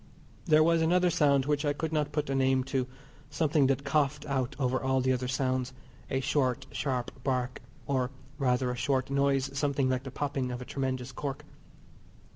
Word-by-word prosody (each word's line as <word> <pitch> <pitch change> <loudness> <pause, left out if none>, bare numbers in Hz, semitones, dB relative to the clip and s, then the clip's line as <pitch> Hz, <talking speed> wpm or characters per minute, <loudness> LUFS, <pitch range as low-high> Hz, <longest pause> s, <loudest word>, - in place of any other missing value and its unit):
There 155 -3 +5
was 165 0 +3
another 180 +2 +3
sound 140 -4 +3
which 145 0 0
I 145 -1 +1
could 160 +2 -3
not 150 -2 0
put 145 -2 -1
a - - +1
name 130 -1 +2
to, 130 -1 -1 0.4
something 150 -2 +2
that 135 0 +1
coughed 145 0 +1
out 135 -2 -1
over 130 -2 0
all 130 0 +1
the 130 0 +2
other 125 0 -2
sounds, 130 0 -1 0.4
a 135 -1 0
short, 130 -3 0
sharp 125 -3 -2
bark, 125 -2 -1 0.2
or 130 -3 0 0.3
rather 125 -1 +1
a - - -3
short 130 +1 0
noise 140 -1 +1
something 140 -2 +1
like 130 -1 0
the 135 - -7
popping 135 -1 -2
of 125 - -4
a 125 - -7
tremendous 130 -1 -3
cork. 135 +2 -5
135 Hz, 185 wpm, -29 LUFS, 130-145 Hz, 0.4 s, There